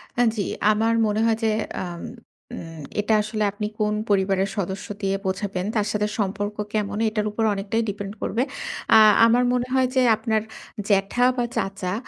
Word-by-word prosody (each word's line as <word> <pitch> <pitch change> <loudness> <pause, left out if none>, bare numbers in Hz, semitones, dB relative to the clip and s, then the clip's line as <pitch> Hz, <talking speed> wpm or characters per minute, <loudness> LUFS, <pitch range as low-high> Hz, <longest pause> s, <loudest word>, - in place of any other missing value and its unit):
অ্যা 245 - +3
জি, 200 - -1 0.3
আমার 225 +2 +2
মনে 210 +1 0
হয় 225 -1 +2
যে, 220 - +3 0.3
আম 175 -1 -6 0.5
উম 165 -2 -8 0.2
এটা 210 +2 +1
আসলে 215 0 -2
আপনি 210 +1 -4
কোন 210 0 +1 0.2
পরিবারের 195 0 +2
সদস্য 190 +2 -3
দিয়ে 195 -1 0
বোঝাবেন? 190 -1 -2
তার 210 -1 +1
সাথে 210 0 0
সম্পর্ক 205 +1 -2 0.2
কেমন? 205 -1 -1
এটার 215 -1 -2
উপর 225 +1 -2
অনেকটাই 200 +3 -1
ডিপেন্ড 200 0 -5
করবে। 230 - -1 0.6
আ - - +9 0.3
আমার 240 +2 +4
মনে 250 0 0
হয় 260 -1 +3
যে, 260 - +4
আপনার 220 0 0 0.5
জ্যাঠা 200 +5 +2
বা 240 - +1
চাচা 190 -1 -2
210 Hz, 170 wpm, -23 LUFS, 195-220 Hz, 0.6 s, আ